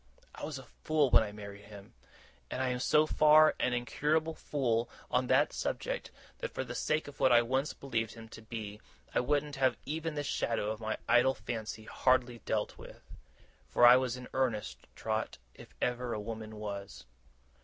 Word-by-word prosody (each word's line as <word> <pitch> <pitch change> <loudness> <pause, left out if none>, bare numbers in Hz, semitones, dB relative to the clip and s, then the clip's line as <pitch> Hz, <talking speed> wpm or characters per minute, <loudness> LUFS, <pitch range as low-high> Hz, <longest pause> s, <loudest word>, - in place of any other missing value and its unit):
I - - -6
was 150 -2 -5
a 135 - -10 0.2
fool 150 -4 +2
when - - +8
I 105 -2 -3
married 100 -1 -10
him; 100 -1 -13 0.6
and - - -4
I 130 - +1
am 125 0 -1
so 150 +4 +4
far 155 0 +6
an 125 - +1
incurable 150 +6 0
fool 120 -7 -1 0.2
on 125 0 +2
that 135 +4 +3
subject, - - -3 0.3
that, - - -3
for - - -4
the - - -7
sake 155 0 0
of 145 - -11
what 130 - +4
I 120 0 +6
once 130 +5 -1
believed 115 -5 -3
him 115 -1 -10
to 110 - -11
be, 110 -2 -7 0.3
I - - +3
wouldn't 145 +2 0
have 130 -1 +2
even 160 +1 -3
this 145 0 -2
shadow 115 -6 -1
of 110 - -5
my 110 -1 -2
idle 125 +2 +4
fancy 110 -2 -5
hardly 125 +1 +1
dealt 105 -1 -2
with. - - -12 0.7
For 120 - +5
I 120 +1 +10
was 125 -1 0
in 125 - -9
earnest, 105 - -2
Trot, - - -2 0.2
if - - -15
ever 125 -1 -1
a - - -3
woman 110 0 -6
was. 100 - -7
125 Hz, 185 wpm, -32 LUFS, 110-140 Hz, 0.7 s, I